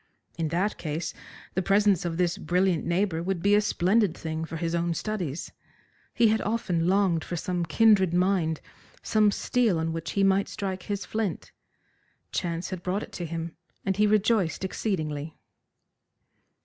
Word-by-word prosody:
In 165 -1 -1
that 180 +7 -1
case 160 +1 -3 0.4
the 190 - +1
presence 195 -1 +3
of 165 -1 -2
this 175 -1 +1
brilliant 180 -2 +1
neighbour 170 -1 +1
would 185 +1 -1
be 200 +1 +4
a 210 - +6
splendid 205 -1 +2
thing 160 0 -3
for 165 - -6
his 165 0 -2
own 170 0 0
studies. 180 -9 -3 0.6
He 235 -2 +5
had 220 +1 +2
often 180 -6 0
longed 185 -4 +2
for 175 - -4
some 175 +1 -2
kindred 200 0 +4
mind, 180 -3 +1 0.4
some 215 -1 +3
steel 220 -1 +1
on 160 0 -1
which 165 -1 -4
he 200 - +2
might 195 0 +3
strike 190 -2 -4
his 200 -2 -2
flint. 215 -5 -3 0.8
Chance 170 +1 -2
had 185 -2 -4
brought 185 +4 -1
it - - -10
to 175 - -5
him, 165 0 -5 0.3
and 195 -1 0
he 210 0 +4
rejoiced 210 -4 +2
exceedingly. 155 -7 -3
180 Hz, 160 wpm, -27 LUFS, 165-200 Hz, 0.8 s, a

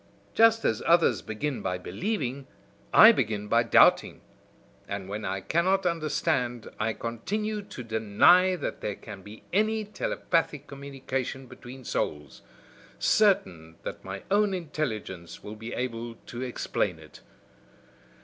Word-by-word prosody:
Just 225 0 +5
as 110 - +1
others 170 0 +4
begin 125 +6 -4
by 90 - -2
believing, 135 - -3 0.4
I - - +10
begin 105 -1 -1
by 115 +2 +4
doubting; 115 - +4 0.7
and 100 -1 -5
when 105 +2 -5
I 95 0 -3
cannot 185 - +1
understand, 150 -8 -1
I 110 +1 0
continue 210 - -3
to 165 -10 -9
deny 115 - +4
that - - -5
there 105 - -3
can 100 - -10
be 105 +3 -12
any 215 +2 +1
telepathic 165 -7 -1
communication 135 -2 -5
between 125 +1 -12
souls; 75 -2 -3 0.6
certain 90 - +2
that - - -6
my 95 +1 -7
own 205 -1 +3
intelligence 115 - -5
will 105 - -7
be 110 +2 -8
able 115 -2 -4
to 120 - -7
explain 125 -2 -2
it. - - -15
125 Hz, 130 wpm, -27 LUFS, 105-175 Hz, 0.7 s, I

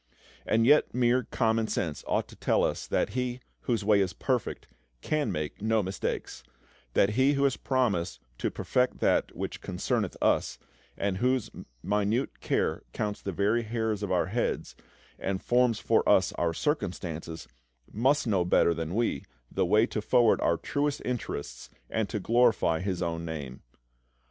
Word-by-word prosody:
And 115 +1 +3
yet 145 0 +4
mere 125 0 +3
common 110 -2 +1
sense 80 -9 -2
ought - - 0
to - - -13
tell - - +1
us - - -1
that - - +1
He, 125 +2 -2 0.3
whose 115 -5 0
way 105 -1 +5
is 95 -4 0
perfect, - - -2 0.3
can 155 -2 0
make 75 +4 -4
no 110 0 +2
mistakes; 95 +1 -4 0.5
that 100 - +4
He 130 +6 +3
who 140 0 +1
has 140 -2 +3
promised 100 - 0 0.2
to - - 0
"perfect 125 0 0
that - - +2
which - - -5
concerneth" - - -2
us, - - +1 0.4
and 100 -2 -1
whose 125 0 +1 0.3
minute 105 +6 0
care - - 0
counts 105 -1 -3
the 100 - -3
very 105 +6 +1
hairs 110 -2 -2
of 100 - -3
our 90 -2 +2
heads, 110 +6 -2 0.4
and 95 -1 -2
forms 120 0 +2
for - - +3
us - - +4
our 85 -1 0
circumstances, 85 - -3 0.5
must 135 +7 +2
know 100 -6 +2
better 85 -1 +3
than 85 +2 -4
we 115 -11 0 0.3
the - - +1
way 110 +2 +5
to 110 - -3
forward 120 +1 +3
our 85 - +2
truest 145 0 -2
interests 70 - -4 0.2
and 110 -3 -1
to 105 - -2
glorify 110 -7 +3
His 90 -2 -2
own 85 0 -2
Name. 75 -6 -6
105 Hz, 160 wpm, -28 LUFS, 90-125 Hz, 0.5 s, way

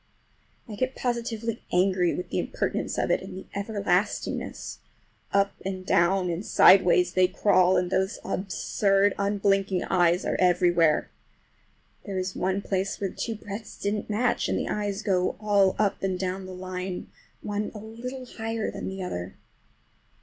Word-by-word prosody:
I 220 - -8
get 255 +5 -2
positively 230 -2 -2
angry 180 -1 +2
with 180 - -5
the - - 0
impertinence - - -2
of - - +1
it - - +2
and - - -8
the 190 - -8
everlastingness. 200 -1 -2 0.5
Up 200 0 +2
and 185 -1 -4
down 180 +2 +3
and 170 +4 -3
sideways 180 -4 +5
they 185 0 +4
crawl, 185 -1 +3
and 180 0 0
those 190 +3 0
absurd, 195 +1 +1
unblinking 195 -2 +1
eyes 175 -1 +2
are - - 0
everywhere. 175 -3 +3 0.9
There 195 -2 -4
is 185 0 -2
one 190 +2 -1
place 195 0 -1
where 195 -2 -2
two 230 - -4
breadths 205 +1 -8
didn't 205 +1 -2
match, 230 +4 +1
and - - +1
the - - -2
eyes 205 0 -2
go 185 -3 +1
all 205 -3 +3
up 205 -1 +1
and 190 -1 -1
down 185 +1 -3
the 185 - -8
line, 185 0 -5 0.3
one 205 0 -2
a - - -5
little 240 +5 -7
higher 225 -2 -3
than - - -6
the 190 0 -5
other. 90 - -5
195 Hz, 155 wpm, -26 LUFS, 185-210 Hz, 0.9 s, sideways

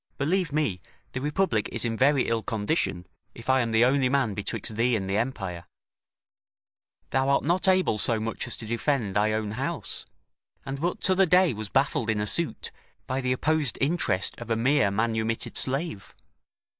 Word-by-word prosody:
Believe 170 +3 0
me, 140 - -1 0.3
the 130 - -4
Republic 150 - 0
is - - -1
in 115 -1 -1
very 135 +3 +3
ill 115 -1 0
condition, 105 - -1 0.3
if 120 +3 -2
I 130 - +4
am 115 - -1
the 110 +1 +4
only 130 0 +2
man 130 -6 +1
betwixt 105 +2 -2
thee 120 +2 +2
and 95 -3 -2
the 95 - -1
empire. 100 -8 -3 1.5
Thou 135 0 +1
art 140 - +3
not 175 +5 +2
able 185 - +3
so 115 +1 +2
much 115 +1 -4
as - - -2
to 115 - -8
defend 115 -2 -1
thy 105 +1 +2
own 110 -1 -2
house, 135 - -4 0.6
and 135 +1 -5
but 175 +2 -1
t'other 190 0 +3
day 180 -3 +4
was 110 -1 -6
baffled 135 -4 +1
in 110 -1 +1
a 105 - 0
suit, 170 +9 0 0.3
by 130 +1 -2
the 125 -1 -1
opposed 150 +1 +1
interest 140 - 0
of 120 -1 -8
a 115 - +2
mere 120 -2 +3
manumitted 110 +2 -1
slave. 135 - -2
125 Hz, 180 wpm, -26 LUFS, 110-145 Hz, 1.5 s, I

